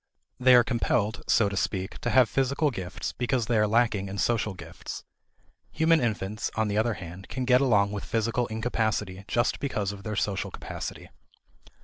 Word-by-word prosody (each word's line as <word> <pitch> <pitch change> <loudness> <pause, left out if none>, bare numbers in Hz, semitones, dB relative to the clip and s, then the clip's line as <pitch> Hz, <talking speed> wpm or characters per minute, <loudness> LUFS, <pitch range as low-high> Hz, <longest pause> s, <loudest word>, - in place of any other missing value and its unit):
They 130 0 +7
are 120 - +7
compelled, 115 -2 0
so 110 - +4
to 100 - -3
speak, 95 0 -2
to - - -2
have 130 -2 +5
physical 140 +4 +1
gifts 95 -5 -5
because 125 -1 -1
they 120 - 0
are 105 - +3
lacking 110 -3 +1
in 100 - -5
social 110 -2 0
gifts. - - -8 0.7
Human 160 0 +3
infants, 110 -2 -2
on 110 -1 +1
the 105 - -1
other 115 0 +1
hand, 90 +2 -9
can 130 -1 -3
get 125 +1 +5
along 105 -7 +3
with 105 -1 -4
physical 115 +2 0
incapacity 110 -4 -2
just 120 0 +1
because 105 -8 -2
of 100 -1 -9
their 110 +1 -4
social 100 -1 -1
capacity. - - -7
110 Hz, 175 wpm, -27 LUFS, 100-125 Hz, 0.7 s, They